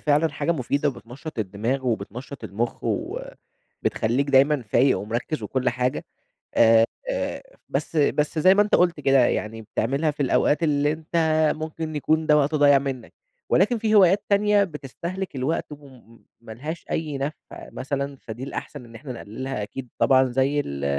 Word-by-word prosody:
فعلًا 150 Hz, +2 st, +2 dB
حاجة 165 Hz, +3 st, -1 dB
مفيدة 145 Hz, 0 st, 0 dB
وبتنشط 130 Hz, +3 st, -8 dB
الدماغ 110 Hz, +6 st, -2 dB
وبتنشط 120 Hz, +5 st, -4 dB
المخ 115 Hz, +4 st, -3 dB
وبتخليك 130 Hz, +6 st, -3 dB
دايمًا 140 Hz, 0 st, +4 dB
فايق 120 Hz, +5 st, +2 dB
ومركز 120 Hz, +8 st, -3 dB
وكل 130 Hz, -1 st, -1 dB
حاجة. 125 Hz, +1 st, -1 dB, 0.5 s
آآ، 115 Hz, 0 st, +6 dB, 0.2 s
آآ -, -, -3 dB, 0.3 s
بس 165 Hz, -, -3 dB
بس 150 Hz, +1 st, +1 dB
زي 185 Hz, +5 st, +6 dB
ما 205 Hz, -, +5 dB
أنت 210 Hz, -, 0 dB
قُلت 175 Hz, -3 st, +3 dB
كده، 135 Hz, -1 st, +4 dB
يعني 110 Hz, +1 st, -2 dB
بتعملها 135 Hz, +8 st, -1 dB
في 145 Hz, 0 st, -11 dB
الأوقات 145 Hz, +4 st, +2 dB
اللي 145 Hz, -1 st, +2 dB
أنت 160 Hz, +2 st, -6 dB, 0.4 s
ممكن 155 Hz, 0 st, -5 dB
يكون 155 Hz, +2 st, +1 dB
ده 150 Hz, 0 st, +5 dB
وقت 150 Hz, +1 st, +1 dB
ضايع 145 Hz, -2 st, +6 dB
منك. 135 Hz, -4 st, -5 dB, 0.4 s
ولكن 210 Hz, +6 st, +3 dB
في 215 Hz, 0 st, +1 dB
هوايات 195 Hz, 0 st, +5 dB
تانية 205 Hz, 0 st, +4 dB
بتستهلك 170 Hz, +2 st, -6 dB
الوقت 150 Hz, +3 st, -2 dB
وم 130 Hz, -5 st, -15 dB, 0.2 s
ما 115 Hz, -1 st, -10 dB
لهاش 150 Hz, +9 st, -6 dB
أي 150 Hz, -3 st, -2 dB
نفع 140 Hz, +3 st, -2 dB, 0.4 s
مثلًا، 140 Hz, +1 st, -3 dB
فدي 115 Hz, +2 st, -8 dB
الأحسن 140 Hz, -1 st, -7 dB
إن 115 Hz, -1 st, -15 dB
إحنا 130 Hz, +3 st, -7 dB
نقللها 120 Hz, +1 st, -5 dB
أكيد 125 Hz, +4 st, -7 dB
طبعًا 130 Hz, 0 st, +5 dB
زي 135 Hz, +3 st, +1 dB
ال 70 Hz, -, -5 dB
140 Hz, 155 wpm, -24 LUFS, 125-155 Hz, 0.5 s, آآ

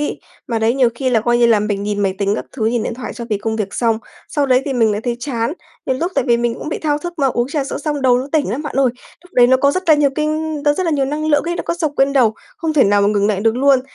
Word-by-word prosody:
ấy. 295 Hz, -, -3 dB, 0.3 s
Mà 230 Hz, -, 0 dB
đấy 225 Hz, +2 st, +1 dB
nhiều 260 Hz, -3 st, +3 dB
khi 255 Hz, +1 st, -1 dB
là, 230 Hz, -, +3 dB
coi 240 Hz, +2 st, +1 dB
như 240 Hz, -, +5 dB
là, 225 Hz, -3 st, +4 dB
mình 205 Hz, -1 st, -2 dB
nhìn 205 Hz, 0 st, -2 dB
máy 195 Hz, -2 st, 0 dB
tính 200 Hz, 0 st, +1 dB
các -, -, -4 dB
thứ, 220 Hz, -3 st, 0 dB
nhìn 235 Hz, 0 st, 0 dB
điện 230 Hz, -, -3 dB
thoại 250 Hz, -, -6 dB
cho 235 Hz, -, -6 dB
cái 210 Hz, -3 st, -1 dB
công 220 Hz, +2 st, -2 dB
việc 205 Hz, -2 st, -3 dB
xong, 230 Hz, -2 st, +1 dB, 0.3 s
sau 290 Hz, -3 st, 0 dB
đấy 255 Hz, 0 st, +3 dB
thì 280 Hz, -, -2 dB
mình 225 Hz, -4 st, +2 dB
lại 205 Hz, -, -2 dB
thấy 240 Hz, -1 st, -1 dB
chán, 235 Hz, -2 st, -2 dB, 0.3 s
nhiều 260 Hz, -, 0 dB
lúc 345 Hz, +7 st, -2 dB
tại 275 Hz, -3 st, +1 dB
vì 235 Hz, -1 st, +3 dB
mình 235 Hz, -1 st, -1 dB
cũng 305 Hz, -, -7 dB
bị -, -, -3 dB
thao 295 Hz, -2 st, 0 dB
thức 345 Hz, +3 st, -6 dB
mà, 275 Hz, -, +2 dB
uống 240 Hz, -1 st, 0 dB
trà 290 Hz, -2 st, -1 dB
sữa -, -, -4 dB
xong 295 Hz, -1 st, -3 dB
đầu 250 Hz, -1 st, +4 dB
nó 260 Hz, -, -4 dB
tỉnh 305 Hz, -10 st, +1 dB
lắm 260 Hz, +8 st, -3 dB
bạn 295 Hz, -, -5 dB
ơi. 270 Hz, -1 st, +4 dB, 0.4 s
Lúc 360 Hz, -, -20 dB
đấy 245 Hz, -1 st, +5 dB
nó 260 Hz, +1 st, +5 dB
có 280 Hz, +2 st, +3 dB
rất 370 Hz, +6 st, -2 dB
là 315 Hz, -, +8 dB
nhiều 290 Hz, -2 st, +2 dB
kinh 310 Hz, 0 st, -2 dB
nó 290 Hz, -, +4 dB
rất 370 Hz, +1 st, -2 dB
là -, -, +1 dB
nhiều 275 Hz, -2 st, +1 dB
năng 300 Hz, +3 st, -3 dB
lượng 295 Hz, -2 st, +3 dB
ấy, 345 Hz, 0 st, -2 dB
nó -, -, -3 dB
có 335 Hz, -, -2 dB
xộc 315 Hz, -4 st, -2 dB
lên 275 Hz, +1 st, +3 dB
đầu, 240 Hz, -6 st, +3 dB, 0.2 s
không 325 Hz, -2 st, -2 dB
thể 300 Hz, -3 st, +4 dB
nào 205 Hz, 0 st, +3 dB
mà 200 Hz, -, +3 dB
ngừng 205 Hz, -1 st, +1 dB
lại 205 Hz, -2 st, 0 dB
được 225 Hz, +2 st, +1 dB
luôn. 270 Hz, -1 st, +4 dB
255 Hz, 335 wpm, -18 LUFS, 225-295 Hz, 0.4 s, là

